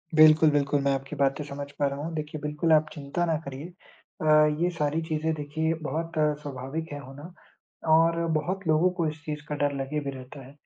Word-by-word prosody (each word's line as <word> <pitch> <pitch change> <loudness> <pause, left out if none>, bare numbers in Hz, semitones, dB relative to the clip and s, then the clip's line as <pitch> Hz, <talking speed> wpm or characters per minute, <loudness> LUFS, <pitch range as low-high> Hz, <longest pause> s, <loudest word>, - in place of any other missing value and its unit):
बिल्कुल, 155 0 +7
बिल्कुल 145 0 +1
मैं 140 0 +2
आपकी 135 +2 -4
बातें 140 +1 +1
समझ 140 0 -6
पा 145 - +3
रहा 140 0 -4
हूँ, 160 +3 -4
देखिए 155 0 -4
बिल्कुल 150 +2 -1
आप 155 0 +4
चिंता 145 +3 -3
ना 165 -2 +1
करिए। 140 +2 -6 0.6
अ, 155 -1 +5
ये 175 - +3
सारी 155 -1 -1
चीज़ें 160 0 -1
देखिए 155 +2 -1
बहुत 165 +4 -3 0.3
स्वाभाविक 145 +3 -5
है 145 - -5
होना, 135 +2 -11 0.7
और 165 +1 +4 0.2
बहुत 180 +5 -2
लोगों 160 +3 +4
को 165 - +2
इस 155 0 -9
चीज़ 150 -1 -4
का 150 - -3
डर 145 0 +1
लगे 145 +3 -2
भी 140 -1 -4
रहता 130 +1 -11
है, 130 - -13
150 Hz, 205 wpm, -27 LUFS, 140-160 Hz, 0.7 s, बिल्कुल